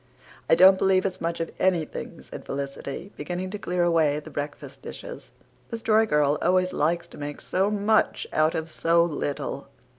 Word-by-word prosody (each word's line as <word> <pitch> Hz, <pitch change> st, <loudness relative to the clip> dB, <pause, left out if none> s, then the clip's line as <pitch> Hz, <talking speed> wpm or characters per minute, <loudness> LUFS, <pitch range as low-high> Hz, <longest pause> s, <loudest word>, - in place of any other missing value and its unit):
"I -, -, +7 dB
don't 190 Hz, +2 st, +7 dB
believe 190 Hz, 0 st, +3 dB
it's 190 Hz, -2 st, -3 dB
much 170 Hz, 0 st, -2 dB
of 165 Hz, -, -3 dB
anything," 175 Hz, -5 st, -1 dB
said -, -, -9 dB
Felicity, 140 Hz, +6 st, -5 dB
beginning 180 Hz, +1 st, -4 dB
to 210 Hz, -, -5 dB
clear 180 Hz, -2 st, 0 dB
away 160 Hz, -4 st, +3 dB
the 150 Hz, -, -11 dB
breakfast 145 Hz, 0 st, -6 dB
dishes. -, -, -9 dB, 0.4 s
"The 230 Hz, -, -4 dB
Story 220 Hz, 0 st, +3 dB
Girl 150 Hz, -4 st, +2 dB
always 185 Hz, +1 st, +2 dB
likes 170 Hz, +3 st, 0 dB
to -, -, -13 dB
make 145 Hz, 0 st, -5 dB
so 190 Hz, +2 st, 0 dB
much 210 Hz, +1 st, +1 dB
out 155 Hz, +1 st, +2 dB
of 160 Hz, 0 st, -2 dB
so 165 Hz, +1 st, +2 dB
little. 145 Hz, -3 st, -3 dB
170 Hz, 175 wpm, -25 LUFS, 150-190 Hz, 0.4 s, I